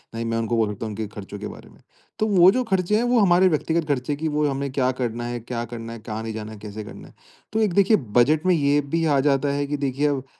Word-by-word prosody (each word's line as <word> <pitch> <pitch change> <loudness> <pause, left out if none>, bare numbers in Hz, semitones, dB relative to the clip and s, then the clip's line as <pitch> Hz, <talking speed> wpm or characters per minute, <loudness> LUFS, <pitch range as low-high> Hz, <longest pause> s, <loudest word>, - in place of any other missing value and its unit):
न - - -5
ही 115 - -3
मैं 115 0 -1
उनको 115 +1 -1
बोल 110 -2 +2
सकता 100 - -6
हूँ 110 - -4
उनके 105 +1 -4
खर्चों 100 0 -8
के 105 - -5
बारे - - -11
में। - - -20 0.4
तो 215 - +2
वो 185 -3 +6
जो 255 +4 0
खर्चे 190 -3 0
हैं, 225 - +2
वो 245 0 +3
हमारे 185 -2 +5
व्यक्तिगत 160 -1 0
खर्चे 145 0 -1
कि 160 +3 -3
वो 150 0 0
हमें 140 0 -2
क्या 130 -1 +1
करना 120 -1 -2
है, 120 0 -4
क्या 120 +1 -4
करना 115 0 -6
है, 115 - -8
कहाँ 110 0 -6
नहीं 115 - -4
जाना 110 0 -6
है, 110 - -10
कैसे 105 +1 -7
करना 100 - -11
है? - - -18 0.4
तो 220 - +1
एक 205 -5 +1
देखिए 200 +3 +4 0.2
बजट 150 +7 +4
में 185 - +4
ये 145 -1 +2
भी 165 +4 -2
आ 145 -3 +3
जाता 140 +1 +1
है 145 0 -1
कि 145 - -2
देखिए, 140 +1 0
अब 135 -2 -2
140 Hz, 290 wpm, -23 LUFS, 115-165 Hz, 0.4 s, वो